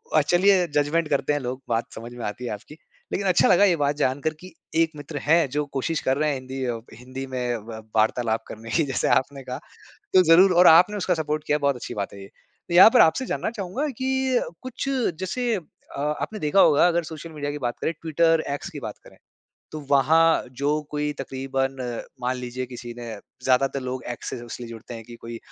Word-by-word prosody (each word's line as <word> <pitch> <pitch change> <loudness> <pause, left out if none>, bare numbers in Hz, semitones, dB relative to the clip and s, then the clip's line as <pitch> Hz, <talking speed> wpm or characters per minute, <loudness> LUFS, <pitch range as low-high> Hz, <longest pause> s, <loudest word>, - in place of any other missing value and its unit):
अ, 155 - +6
चलिए, 180 +3 +3
जज़मेंट 150 +2 +1
करते 145 +1 +1
हैं 145 - 0
लोग, 130 0 -5
बात 115 0 -1
समझ 120 +2 -8
में 120 -1 -6
आती 120 +4 -5
है - - -3
आपकी। 105 +9 -10 0.4
लेकिन 200 - -1
अच्छा 185 - +4
लगा 190 +2 +6
ये 185 -4 +4
बात 145 -1 +1
जानकर 140 +3 0
कि 185 0 -12 0.3
1 165 - +2
मित्र 145 0 -7
हैं, 160 -2 +3
जो 150 +2 -1
कोशिश 155 +4 -1
कर 130 +1 +1
रहे 155 0 +1
हैं, 140 - 0
हिंदी 130 +1 -6
अ 120 -2 -2
हिंदी 130 +2 -7
में 125 -2 -2
व 110 +1 -9
वार्तालाप 110 +1 +1
करने 115 +1 -9
की, 165 - +2
जैसे 135 - -1
आपने 135 0 -9
कहा। 125 0 -5 0.6
तो 185 -1 +7
ज़रूर 180 +3 +6
और 175 +1 +6
आपने 180 +6 +6
उसका 185 -2 +1
सपोर्ट 155 -1 -2
किया, 150 - +3
बहुत 140 -2 +1
अच्छी 120 0 -7
बात 100 -1 -4
है 100 - -10
ये। 95 - -10 0.4
तो - - -3
यहाँ 185 +5 +10
पर - - +7
आपसे 205 +11 +3
जानना - - -2
चाहूँगा 230 +7 -3
कि 265 -1 +1 0.2
कुछ 255 +2 -4 0.3
जैसे 230 +5 -1 0.4
अ, - - -4 0.2
आपने 215 - -4
देखा 150 +4 +2
होगा, 150 +4 +6
अगर 170 0 +1
सोशल 160 +1 -8
मीडिया 145 -2 -4
की 150 - -5
बात 120 -2 -3
करें, - - 0
ट्विटर, 165 0 +2
एक्स 140 - -5
की - - -8
बात - - -7
करें। - - -17 0.6
तो 155 - -5
वहाँ 160 +4 +4 0.2
जो 150 +2 +1
कोई 150 0 -1
तकरीबन, 135 0 -2 0.4
मान 125 +1 -1
लीजिए 125 +1 -5
किसी 120 -1 -8
ने 120 - -7 0.4
ज़्यादातर 135 +1 +2
लोग 130 0 -4
एक्स - - -7
से - - -4
सिर्फ़ 120 -1 -9
इसलिए 120 -1 -7
जुड़ते 115 +1 -9
हैं 115 -1 -9
कि 120 0 -11
कोई 115 0 -7
145 Hz, 220 wpm, -24 LUFS, 125-165 Hz, 0.6 s, यहाँ